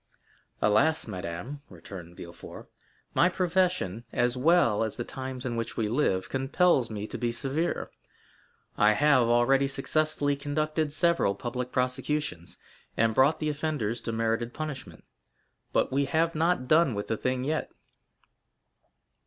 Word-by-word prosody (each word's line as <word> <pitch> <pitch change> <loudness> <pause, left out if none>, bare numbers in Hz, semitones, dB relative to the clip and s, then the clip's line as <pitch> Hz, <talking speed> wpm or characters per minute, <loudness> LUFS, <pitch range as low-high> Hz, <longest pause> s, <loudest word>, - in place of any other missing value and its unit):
"Alas, 140 +10 +3
madame," 90 +10 -6
returned 90 -1 -11
Villefort, 85 0 -10 0.5
"my 180 - +4
profession, 180 - 0
as 120 +1 +1
well 130 -6 +3
as 110 - -3
the 120 - -3
times 130 0 -6
in 120 -2 -2
which 115 -1 -4
we 110 - 0
live, 105 -6 0
compels 135 0 +2
me 105 -2 -4
to - - -7
be 120 -1 0
severe. 140 +7 -2 0.9
I 105 +1 +6
have 140 -1 +4
already 125 +4 +3
successfully 145 +1 0
conducted 155 +2 -1
several 170 - +2
public 125 +3 -4
prosecutions, 125 - -2 0.4
and 115 0 +3
brought 140 +6 +4
the 155 - -1
offenders 145 -7 -2
to 115 - -3
merited 115 +1 -1
punishment. 150 -3 -6 0.7
But - - +1
we 140 +1 +1
have 165 +4 +1
not 160 -4 +1
done 155 -5 +4
with 100 - -3
the 110 - 0
thing 130 +2 -1
yet." 155 +3 -2
130 Hz, 135 wpm, -28 LUFS, 115-155 Hz, 0.9 s, I